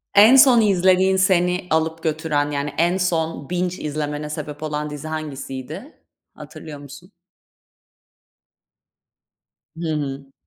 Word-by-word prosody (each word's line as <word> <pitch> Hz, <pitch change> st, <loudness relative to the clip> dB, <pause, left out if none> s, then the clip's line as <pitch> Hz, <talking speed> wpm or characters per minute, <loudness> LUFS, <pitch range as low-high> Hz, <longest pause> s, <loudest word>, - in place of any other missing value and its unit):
E 200 Hz, -, +8 dB
En 235 Hz, +5 st, +8 dB
son 255 Hz, -4 st, +7 dB
izlediğin 190 Hz, -1 st, +3 dB
seni 180 Hz, -1 st, +2 dB
alıp 160 Hz, +1 st, 0 dB
götüren, 150 Hz, -2 st, -1 dB
yani, 145 Hz, 0 st, -3 dB
en 175 Hz, +3 st, +2 dB
son 165 Hz, -5 st, -2 dB
binge 180 Hz, 0 st, -2 dB
izlemene 150 Hz, 0 st, -4 dB
sebep 150 Hz, 0 st, -6 dB
olan 150 Hz, 0 st, -3 dB
dizi 150 Hz, +1 st, -7 dB
hangisiydi? 155 Hz, -, -7 dB, 0.3 s
Hatırlıyor 150 Hz, -3 st, -10 dB
musun? 145 Hz, +7 st, -13 dB, 2.7 s
Hı 165 Hz, -1 st, -4 dB
hı. 135 Hz, -2 st, -5 dB
160 Hz, 115 wpm, -21 LUFS, 150-180 Hz, 2.7 s, E